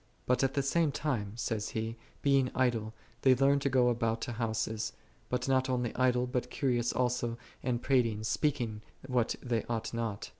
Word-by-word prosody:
" - - -36
But 125 +2 +2
at 135 - +1
the 140 - +2
same 155 +2 +2
time," 120 -9 -2
saith 110 -2 -2
he, 110 +1 -2 0.3
"being 135 -2 +4
idle 115 -4 +1 0.3
they 130 -1 +6
learn 140 +2 +4
to 140 - 0
go 125 -2 +4
about 115 -1 0
to 125 - -3
houses: 110 -2 -2 0.4
but 125 - -1
not 130 0 +2
only 125 -2 -1
idle, 125 -1 +3
but 125 0 -2
curious 120 -3 +1
also 125 -2 0 0.2
and 120 -2 -1
prating, 115 -5 +2
speaking 120 -4 0 0.3
what 125 -3 +1
they 120 -3 0
ought 115 -1 -3
not." 115 -3 -3
125 Hz, 180 wpm, -31 LUFS, 115-130 Hz, 0.4 s, they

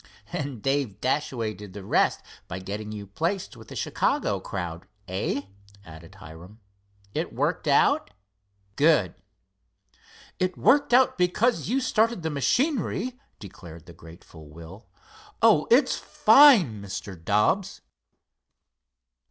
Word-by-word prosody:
"And 140 -7 -5
Dave 135 -6 -1
Dashaway 125 -5 -2
did 100 -1 -12
the 100 -1 -9
rest - - +1 0.2
by 90 - -6
getting 105 +3 -6
you 105 -1 -7
placed 165 - -3
with 110 -2 -14
the - - -10
Chicago - - -1
crowd; 90 -3 -6 0.2
eh?" 95 +9 -2 0.4
added 80 +3 -13
Hiram. 90 +3 -13 0.5
"It - - -3
worked - - -1
out? - - +3 0.7
Good!" 145 - +3 1.3
"It 185 -1 -1
worked 285 0 +3
out 250 -4 +4
because 210 +8 +1
you 260 +3 +1
started 230 -6 0
the 160 - -2
machinery," 250 - -1 0.2
declared 85 -5 -12
the 85 - -13
grateful 80 -2 -15
Will. 85 +7 -13 0.5
"Oh, - - +4
it's - - +4
fine, 220 - +5
Mr. 100 0 -7
Dobbs." 105 - 0
110 Hz, 120 wpm, -25 LUFS, -, 1.3 s, fine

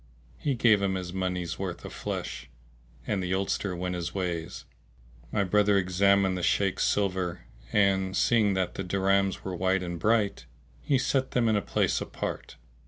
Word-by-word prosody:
He 140 -3 0
gave 110 -4 +4
him 95 -1 0
his 90 -1 -5
money 90 -1 -1
s 85 0 -6
worth 95 -3 -5
of - - -7
flesh - - -5 0.6
and 100 -2 -1
the 90 0 -1
oldster 95 0 -1
went 90 +1 -3
his 85 0 -4
ways. 90 -3 -3 0.7
My 105 - +1
brother 105 +1 +3
examined 95 +1 +3
the 90 - -3
Shaykh's 95 +2 +1
silver, 90 -6 -1 0.3
and, 95 -2 +2
seeing 110 -4 +3
that 95 -1 -1
the 95 - -4
dirhams 95 +1 +1
were 95 -1 -4
white 95 +1 +1
and 85 -1 -5
bright, 105 +1 +1 0.3
he 140 - +2
set 130 +1 0
them 120 -2 +2
in 110 - +3
a 105 - +2
place - - 0
apart. - - -5
95 Hz, 170 wpm, -28 LUFS, 90-100 Hz, 0.7 s, gave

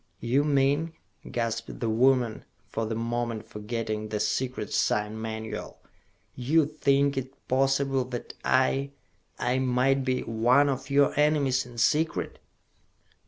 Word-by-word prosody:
"You 125 +5 +2
mean," 145 +3 +1 0.4
gasped 115 -1 -3
the 115 - -1
woman, 120 0 +2 0.2
for 115 0 -3
the 110 - -2
moment 115 -1 -3
forgetting 110 0 -4
the 105 0 -2
secret 130 +4 -2
sign 105 +1 0
manual, 110 0 -5 0.6
"you 145 +5 +2
think 140 -2 +1
it 135 +1 -6
possible 135 0 +2
that 125 -1 -6
I 135 +1 +2 0.4
I 125 +2 0
might 130 +1 +2
be 130 -1 0
one 120 +6 +3
of 130 0 -3
your 140 0 +4
enemies, 140 -4 +2
in 120 -1 -13
secret?" 155 +7 +1
130 Hz, 125 wpm, -27 LUFS, 115-140 Hz, 0.6 s, your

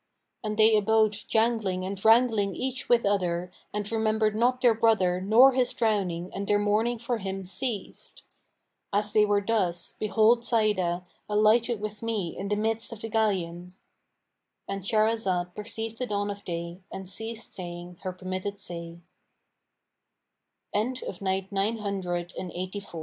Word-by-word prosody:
And 215 -1 -3
they 220 0 +6
abode 215 +1 +4
jangling 215 -3 0
and 195 0 -5
wrangling 220 -3 +4
each 260 0 -3
with 235 -2 +4
other 180 -3 0 0.2
and 210 0 -4
remembered 220 -1 +1
not 245 +3 +2
their 245 -2 +5
brother 215 -5 +2
nor 230 +8 +7
his 255 -1 +1
drowning 190 -6 0
and 200 0 -4
their 205 - +4
mourning 215 +4 +1
for 235 +1 -2
him 190 -1 -4
ceased. 205 +2 -5 0.7
As 205 +1 0
they 210 -1 +5
were 205 -1 +2
thus, 180 -6 0
behold 220 +3 +3
Sa'idah 190 -7 +1 0.2
alighted 215 +2 +3
with 210 0 -5
me 215 -7 -2
in 195 - -4
the 210 - +1
midst 225 +3 -1
of 230 - -8
the 225 - -4
galleon,"—And 190 -1 -4
Shahrazad 195 -4 +1
perceived 225 +2 -5
the 250 - -2
dawn 205 -1 -1
of 200 0 -8
day 170 +1 -5
and 190 -1 -7
ceased 225 +4 -6
saying 175 -1 -7
her 185 - -3
permitted 185 +2 -4
say. 170 -3 -7
210 Hz, 130 wpm, -27 LUFS, 185-225 Hz, 0.7 s, nor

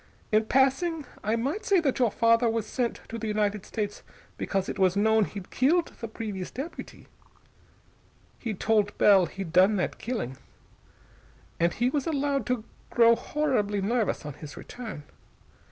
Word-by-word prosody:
In 215 0 +3
passing, 275 +6 +2 0.2
I 215 +2 +1
might 280 - -2
say 395 -3 +4
that 275 -5 0
your 245 -3 +4
father 230 +2 +3
was 225 -1 -1
sent 240 +1 -2
to 230 - -5
the 225 - -4
United 210 -1 -1
States 205 -2 -3 0.3
because 195 -1 -2
it - - -5
was 185 -1 +3
known 220 +1 +4
he'd 195 -2 -9
killed 325 +7 +2
the 230 - -4
previous 205 -4 -5
deputy. 285 +7 -8 1.3
He 225 -3 -3
told 210 0 +1
Bell 195 -4 +6
he'd 190 -4 -7
done 190 +4 +5
that 185 - -2
killing. 210 - -4 1.2
And 170 +1 +3
he 245 +6 0
was 285 0 -1
allowed 285 -3 0
to 250 -3 -1 0.3
grow 230 -1 +5
horribly 235 -7 0
nervous 215 -3 0
on 150 - -5
his 145 +1 -10
return. 225 -11 -8
225 Hz, 155 wpm, -27 LUFS, 200-255 Hz, 1.3 s, Bell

